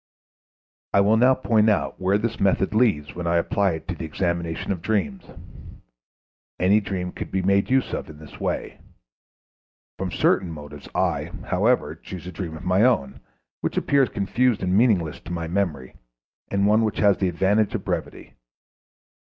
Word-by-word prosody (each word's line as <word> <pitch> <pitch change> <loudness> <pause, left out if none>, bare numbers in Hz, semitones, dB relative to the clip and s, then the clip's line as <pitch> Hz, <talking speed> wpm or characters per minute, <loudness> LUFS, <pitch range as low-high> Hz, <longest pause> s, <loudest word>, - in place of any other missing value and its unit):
I 100 - +5
will 105 +3 +4
now 125 +3 +5
point 110 -4 +2
out 105 - -1
where 95 +2 +3
this 115 +2 -3
method 95 0 +2
leads 105 -11 +2
when 85 -1 -5
I 85 - +2
apply 95 +2 +1
it 80 - -7
to - - 0
the 85 - -7
examination 85 +1 -2
of 90 -4 -3
dreams. 140 - -1 1.3
Any 100 +4 +4
dream 95 -2 -4
could - - -7
be 95 -1 -1
made 100 +1 +2
use 130 0 +1
of - - -4
in 75 - -11
this 75 -1 -13
way. - - -3 1.2
From 95 -1 -2
certain 90 +1 +1
motives 75 -2 -10
I, - - 0
however, - - +1
choose 90 -2 -10
a 90 - -6
dream 80 -2 -6
of 85 - -11
my 90 +2 +3
own, 110 - +2 0.4
which - - -3
appears 140 -3 +3
confused 115 +4 0
and 90 0 +1
meaningless 100 -9 +2
to 85 - -10
my 85 -1 -3
memory, 80 -8 -2 0.6
and 100 0 +1
one 105 +2 +4
which 110 - -1
has 100 -2 +3
the 95 - +1
advantage 100 +5 +1
of - - -4
brevity. - - -4
95 Hz, 170 wpm, -24 LUFS, 85-105 Hz, 1.3 s, I